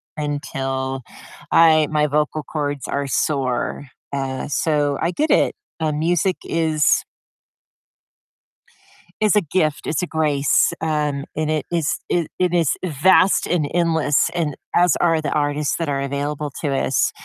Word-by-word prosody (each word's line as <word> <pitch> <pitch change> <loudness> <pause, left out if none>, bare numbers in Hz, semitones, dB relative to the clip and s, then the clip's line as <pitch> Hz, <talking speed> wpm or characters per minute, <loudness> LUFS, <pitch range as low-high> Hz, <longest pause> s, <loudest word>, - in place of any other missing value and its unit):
until 135 -3 -3 0.5
I 155 -2 +5
my 150 -1 +2
vocal 150 +1 -1
cords 145 -1 -3
are 140 0 -2
sore. 135 0 -1 0.3
Uh, 135 -1 -3
so, 145 -1 0
I 170 - +1
get 305 - -1
it, - - +3 0.3
uh, 155 - +1
music 170 +4 0
is 160 -2 +2 2.2
is 215 0 +3
a 210 - +5
gift. 155 -3 -1
It's 155 +3 -1
a - - -2
grace, 150 -3 +2
um, 150 -3 -1
and 155 0 -1
it 155 -1 -1
is 165 -3 0
it 170 -3 0
it 180 -1 +1
is 170 -5 +2 0.2
vast, 185 +4 +3
and 160 -5 0
endless, 160 -4 +2
and 155 -5 -1 0.2
as 175 -2 +4
are 165 -2 +3
the 155 - -3
artists 145 0 0
that 165 -3 -2
are 140 -1 -1
available 145 +1 -3
to 150 - -1
us. 135 - +1
150 Hz, 145 wpm, -21 LUFS, 145-165 Hz, 2.2 s, I